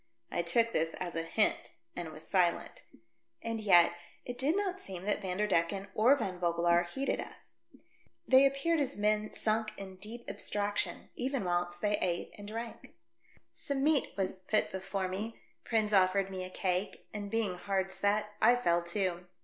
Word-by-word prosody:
I -, -, +1 dB
took 230 Hz, +7 st, +2 dB
this 165 Hz, +1 st, 0 dB
as 175 Hz, -2 st, -4 dB
a 165 Hz, -, -1 dB
hint, 165 Hz, +6 st, 0 dB, 0.2 s
and 170 Hz, -2 st, -5 dB
was 155 Hz, -, -10 dB
silent. 180 Hz, -3 st, +1 dB, 0.6 s
And 230 Hz, -1 st, -2 dB
yet 175 Hz, -5 st, +6 dB, 0.3 s
it 245 Hz, 0 st, -6 dB
did 295 Hz, +8 st, +3 dB
not 385 Hz, -2 st, -1 dB
seem 190 Hz, -1 st, -7 dB
that 205 Hz, 0 st, 0 dB
Vanderdecken 195 Hz, +1 st, 0 dB
I20 170 Hz, +3 st, +2 dB
THE -, -, -3 dB
DEATH -, -, -9 dB
SHIP. -, -, -25 dB
or 240 Hz, +6 st, +5 dB
Van 185 Hz, -9 st, -3 dB
Vogelaar 170 Hz, 0 st, +2 dB
heeded 270 Hz, +10 st, -2 dB
us. -, -, -12 dB, 0.7 s
They 265 Hz, +1 st, +7 dB
appeared 275 Hz, +5 st, +1 dB
as 280 Hz, -4 st, -1 dB
men 210 Hz, +1 st, +1 dB
sunk 215 Hz, 0 st, -1 dB
in 190 Hz, -1 st, -8 dB
deep 225 Hz, +5 st, -8 dB
abstraction, 205 Hz, 0 st, -1 dB
even 260 Hz, -2 st, -1 dB
whilst 175 Hz, 0 st, -1 dB
they 205 Hz, 0 st, +1 dB
ate 175 Hz, -1 st, -2 dB
and 205 Hz, 0 st, -10 dB
drank. 230 Hz, +2 st, -7 dB, 0.6 s
Some 270 Hz, -, -3 dB
meat 300 Hz, -1 st, +3 dB
was 190 Hz, -1 st, -1 dB
put 210 Hz, +3 st, +1 dB
before 190 Hz, 0 st, -2 dB
me; 210 Hz, +5 st, -5 dB, 0.3 s
Prins 215 Hz, -2 st, +1 dB
offered 195 Hz, 0 st, +3 dB
me 185 Hz, -1 st, -4 dB
a -, -, -7 dB
cake, 185 Hz, +1 st, -2 dB
and, 205 Hz, -1 st, -4 dB
being 220 Hz, -3 st, 0 dB
hard 190 Hz, +1 st, -1 dB
set, 205 Hz, +2 st, 0 dB
I 240 Hz, +3 st, +7 dB
fell 175 Hz, -8 st, +2 dB
to. 180 Hz, -1 st, -2 dB
200 Hz, 180 wpm, -32 LUFS, 180-225 Hz, 0.7 s, They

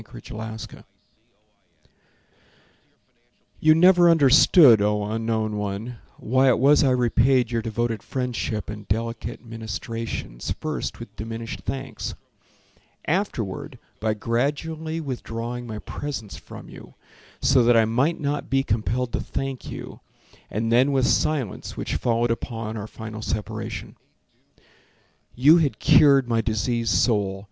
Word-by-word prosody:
Harlan 110 Hz, 0 st, -8 dB
Sewall -, -, -10 dB, 2.8 s
You 155 Hz, 0 st, +5 dB
never 175 Hz, +1 st, +6 dB
understood, 145 Hz, -, +7 dB
O 105 Hz, 0 st, +1 dB
unknown 110 Hz, 0 st, -2 dB
one, 105 Hz, +4 st, -4 dB, 0.2 s
Why 130 Hz, +3 st, +2 dB
it 125 Hz, -, +3 dB
was 140 Hz, +4 st, +5 dB
I 135 Hz, -, +3 dB
repaid 125 Hz, 0 st, +2 dB
Your 115 Hz, -1 st, 0 dB
devoted 115 Hz, 0 st, -2 dB
friendship 120 Hz, -5 st, -3 dB
and 105 Hz, 0 st, -9 dB
delicate 115 Hz, +2 st, -3 dB
ministrations 110 Hz, -, -5 dB
First 155 Hz, -1 st, -4 dB
with 115 Hz, -3 st, -10 dB
diminished 115 Hz, +1 st, -6 dB
thanks, 135 Hz, 0 st, -5 dB, 0.9 s
Afterward 150 Hz, -, -2 dB, 0.2 s
by 110 Hz, 0 st, 0 dB
gradually 150 Hz, +8 st, -2 dB
withdrawing 120 Hz, -4 st, -5 dB
my 110 Hz, -2 st, -5 dB
presence 115 Hz, -3 st, -6 dB
from -, -, -11 dB
you, -, -, -13 dB, 0.4 s
So 130 Hz, -1 st, +4 dB
that 120 Hz, 0 st, +5 dB
I 110 Hz, -, +5 dB
might 130 Hz, +9 st, +1 dB
not 145 Hz, -1 st, -2 dB
be 135 Hz, 0 st, +2 dB
compelled 115 Hz, +3 st, -1 dB
to -, -, 0 dB
thank 135 Hz, -1 st, -5 dB
you, -, -, -8 dB, 0.5 s
And 115 Hz, +2 st, -2 dB
then 130 Hz, +4 st, +4 dB
with 135 Hz, -2 st, +2 dB
silence 140 Hz, -10 st, -1 dB
which -, -, -3 dB
followed 120 Hz, 0 st, +1 dB
upon 115 Hz, -2 st, -4 dB
Our 105 Hz, -1 st, -5 dB
final 110 Hz, 0 st, -8 dB
Separation. 105 Hz, -1 st, -5 dB, 1.4 s
You 145 Hz, +7 st, +6 dB
had 145 Hz, -10 st, +1 dB
cured 140 Hz, +1 st, +5 dB
my 115 Hz, -1 st, +1 dB
diseased 115 Hz, 0 st, -1 dB
soul. 100 Hz, -2 st, +1 dB
115 Hz, 125 wpm, -24 LUFS, 110-135 Hz, 2.8 s, understood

